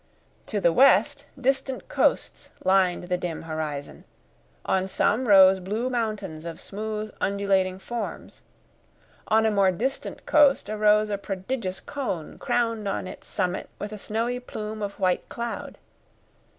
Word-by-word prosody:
To 210 - -1
the 170 -3 +3
west 285 - +4
distant 265 0 -1
coasts - - 0
lined 185 -2 +3
the 180 0 -1
dim 170 -3 -4
horizon, 155 -3 -5 0.6
on 190 0 +1
some 220 +6 +1
rose 190 -2 +7
blue 215 +7 -2
mountains 215 -9 -3
of 165 -1 -7
smooth, 215 +1 -5
undulating 195 -2 +1
forms; 235 +4 -6 0.9
on 220 +1 +3
a 220 - +3
more 200 -2 +4
distant 260 +9 -4
coast 285 -7 +4
arose 210 0 +3
a 200 - -1
prodigious 195 0 -4
cone 215 - -5
crowned 230 -3 0
on 195 - -2
its 185 - -9
summit 180 0 -2
with 205 - -5
a 210 - -7
snowy 230 +5 -2
plume 215 -3 -6
of 200 -1 -5
white 185 -2 0
cloud. 235 -1 -5
210 Hz, 135 wpm, -25 LUFS, 185-235 Hz, 0.9 s, rose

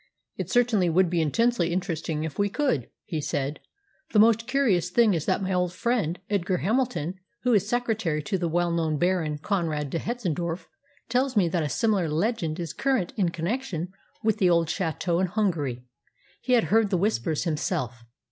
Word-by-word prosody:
"It - - -4
certainly 230 -7 +3
would 175 +1 +3
be 170 -2 +2
intensely 180 +2 +1
interesting 165 -4 -2
if 160 +2 -5
we 205 0 +2
could," 200 - 0 0.2
he 160 -3 -3
said, 140 0 -2 0.5
"The - - +3
most 225 +2 +5
curious 245 -10 +2
thing 220 +2 +4
is 160 -3 -2
that - - +1
my 190 0 -1
old 180 -1 0
friend 205 -6 0
Edgar 190 -2 0
Hamilton, 190 - -1 0.2
who 250 -1 +3
is 205 -1 +2
secretary 220 -11 0
to 190 +4 -1
the 170 - 0
well 175 +1 +1
known 160 -2 0
Baron 175 -3 +1
Conrad 155 -5 -1
de 165 - -1
Hetzendorf, 175 -7 -3 0.4
tells 255 +1 0
me 185 -4 +4
that 170 0 0
a 150 - -1
similar 205 -6 +1
legend 165 0 -1
is 165 -3 -4
current 265 -10 0
in 190 -6 +1
connection 180 0 -3 0.3
with 220 0 +1
the 185 -4 +4
old 170 -2 +3
château 175 0 -1
in 190 - +2
Hungary. 160 - -1 0.6
He 255 - 0
had 235 -3 +5
heard 225 -2 +4
the 190 - +1
Whispers 165 - 0
himself." 130 -7 -2
180 Hz, 180 wpm, -26 LUFS, 160-220 Hz, 0.6 s, most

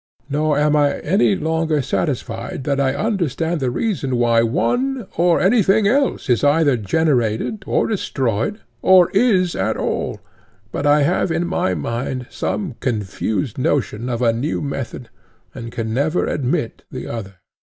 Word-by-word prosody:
Nor 150 0 +1
am 150 +1 +3
I 145 -1 +2
any 195 +4 +2
longer 160 -3 0
satisfied 135 -1 -3
that 140 0 0
I 135 -1 +1
understand 170 - -1
the 130 -3 0
reason 135 - -1
why 120 -1 +3
one 245 - 0
or 170 +1 +3
anything 205 0 +3
else 275 +5 +1
is 125 0 +2
either 145 -1 +4
generated 125 - 0
or - - +2
destroyed 135 - -1 0.2
or 185 -2 +6
is 195 -5 +2
at - - -1
all, - - -2 0.5
but 145 - -1
I 145 0 +5
have 175 +3 +1
in 170 +2 0
my 95 - 0
mind 120 - -3
some 185 - -3
confused 110 +2 -2
notion 125 -3 -1
of 120 0 -2
a 115 -1 +3
new 130 +7 -2
method, 130 -4 -5 0.4
and 115 -2 -7
can 110 -1 -3
never 150 +7 +1
admit 125 -4 -2
the - - -6
other. 100 -4 -6
145 Hz, 150 wpm, -20 LUFS, 120-175 Hz, 0.5 s, or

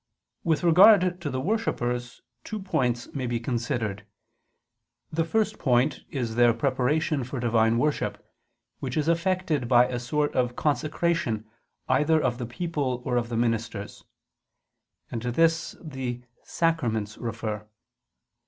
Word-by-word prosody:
With 160 0 +1
regard 180 +1 +6
to 150 - -2
the 130 -1 -2
worshippers 125 - -2 0.2
two 215 - -5
points 125 -11 -1
may 130 -3 -2
be 120 -1 -1
considered. 120 -4 -2 1.1
The 165 +1 +1
first 215 +5 0
point 125 0 +1
is 120 -5 -3
their 120 0 +4
preparation 140 +4 +1
for 130 +2 -5
Divine 115 -1 +2
worship, 150 +4 0 0.6
which 130 0 -4
is 155 0 0
effected 170 -5 +1
by 120 0 +6
a 125 - -3
sort 145 +4 -1
of 125 -1 0
consecration 150 -6 0 0.4
either 155 +3 +3
of 130 -4 -1
the 120 - -3
people 130 -3 -2
or 125 - 0
of 120 -1 0
the 115 - -2
ministers; 115 -3 -2 1.1
and 115 - -3
to 120 +1 -2
this 165 +4 +2
the 130 -6 -5 0.2
sacraments 115 -11 -1
refer. 110 -2 -4
130 Hz, 135 wpm, -26 LUFS, 120-160 Hz, 1.1 s, regard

